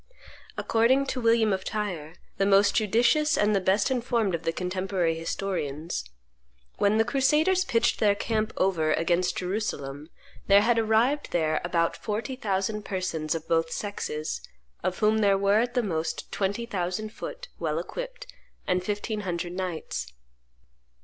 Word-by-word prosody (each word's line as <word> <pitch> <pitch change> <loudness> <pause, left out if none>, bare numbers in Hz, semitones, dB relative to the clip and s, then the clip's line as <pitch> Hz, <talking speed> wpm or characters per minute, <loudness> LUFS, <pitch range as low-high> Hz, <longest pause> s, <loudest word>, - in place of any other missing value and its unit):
According 245 +5 +3
to 255 - -4
William 230 -2 +3
of 190 0 -2
Tyre, 180 -7 -4 0.2
the 195 - +2
most 200 0 +5
judicious 240 +8 +3
and 210 0 +3
the 195 - +2
best 190 +7 +2
informed 235 -5 0
of 165 - -1
the 165 - 0
contemporary 180 -1 -1
historians, 165 - -3 0.8
"When 205 +1 +3
the 225 - +3
crusaders 300 +8 +3
pitched 230 -11 +1
their 205 -2 +4
camp 215 +1 -1
over 160 -5 +2
against 175 +2 +1
Jerusalem, 160 -7 -3 0.4
there 200 0 +7
had 230 +2 +3
arrived 225 +6 +2
there 155 -2 +1
about 170 -1 +1
forty 220 +4 -3
thousand 210 -2 -1
persons 175 -5 -2
of 165 0 -5
both 165 0 +2
sexes, 155 - -3 0.4
of 185 0 -1
whom 215 +1 +3
there 200 -2 +4
were 200 +2 +3
at 240 +2 -1
the 245 - +2
most 165 -5 -3
twenty 205 +4 -1
thousand 195 0 -3
foot, - - -7
well - - -1
equipped, - - -5 0.4
and 180 0 +1
fifteen 210 +2 -2
hundred 175 -3 -3
knights." 180 - -4
200 Hz, 150 wpm, -27 LUFS, 175-225 Hz, 0.8 s, there